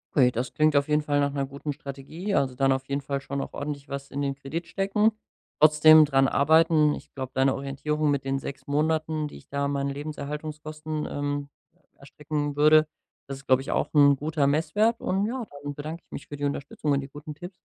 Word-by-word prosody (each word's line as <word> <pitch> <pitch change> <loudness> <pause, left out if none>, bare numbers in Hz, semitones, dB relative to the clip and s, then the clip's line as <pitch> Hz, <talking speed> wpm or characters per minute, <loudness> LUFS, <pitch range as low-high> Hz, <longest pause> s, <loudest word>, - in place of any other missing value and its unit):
Okay, 130 -4 +6
das 125 +1 -4
klingt 155 -1 +3
auf 140 0 +3
jeden 150 0 +2
Fall 145 -1 0
nach 140 0 +1
'ner 140 -1 -2
guten 140 +2 -5
Strategie, 145 +9 -5
also 135 -2 +1
dann 135 +1 +2
auf 130 0 -1
jeden 140 +1 -2
Fall 140 0 -3
schon 140 0 -4
auch - - -7
ordentlich 140 -1 -5
was 140 0 -6
in 140 - -3
den 140 -1 -1
Kredit 150 +5 -6
stecken. 200 +4 +2 0.5
Trotzdem 155 +1 +7
dran 135 -2 +3
arbeiten. 155 +1 +4
Ich - - -9
glaube, 130 -1 -5
deine 135 0 +2
Orientierung 145 +2 -1
mit 140 -2 -1
den 135 0 -1
6 135 0 -7
Monaten, 155 +1 0
die - - -11
ich - - -18
da 140 0 -1
meinen 140 0 -1
Lebenserhaltungskosten, 155 +1 -5
ähm, 145 0 -3 0.5
erstrecken 145 +1 -4
würde, 155 +1 +5 0.4
das 135 -1 -6
ist, 135 - -16
glaub 130 0 +5
ich, 135 - -5
auch - - 0
'n 140 -1 +7
guter 150 +1 -1
Messwert 165 +11 +1
und 195 +2 0
ja, 240 0 -4 0.2
dann 145 0 -4
bedanke 155 +4 -7
ich - - -45
mich - - -8
für 145 - -7
die 145 - -6
Unterstützung 140 +1 -3
und 140 - +3
die 135 - -9
guten 150 +2 -9
Tipps. 175 +4 -10
145 Hz, 215 wpm, -26 LUFS, 140-155 Hz, 0.5 s, Trotzdem